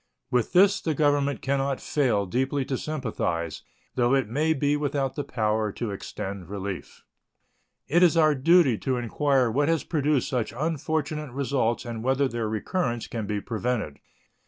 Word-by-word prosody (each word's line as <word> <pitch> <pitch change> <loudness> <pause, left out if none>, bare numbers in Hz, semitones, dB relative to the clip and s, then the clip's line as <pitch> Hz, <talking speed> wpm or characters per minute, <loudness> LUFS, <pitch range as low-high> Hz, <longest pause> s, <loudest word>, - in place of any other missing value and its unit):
With 125 -2 +1
this 195 +2 +5
the 160 -2 -1
Government 145 -1 +1
can 140 0 +1
not 135 0 -1
fail 120 -9 +1
deeply 130 +7 -1
to 135 - -2
sympathize, 110 - -3 0.3
though 125 +1 +2
it 135 -4 +1
may 150 +8 +1
be 145 +1 +1
without 140 -2 -1
the 145 - -2
power 110 -4 0
to 115 -4 -4
extend 95 -2 -6
relief. 100 -2 -6 0.8
It 170 +5 +3
is 175 -2 +5
our 155 -2 +5
duty 145 - +4
to 130 -2 -1
inquire 130 +1 +1
what 145 +6 +1
has 165 -2 +1
produced 150 -4 +1
such 120 -5 -2
unfortunate 155 -1 -2
results 130 -4 0
and 115 -2 -5
whether 135 +2 +2
their 115 -3 -3
recurrence 120 - -2
can 110 -3 -5
be 105 -1 -2
prevented. 115 -8 -3
130 Hz, 160 wpm, -26 LUFS, 115-145 Hz, 0.8 s, this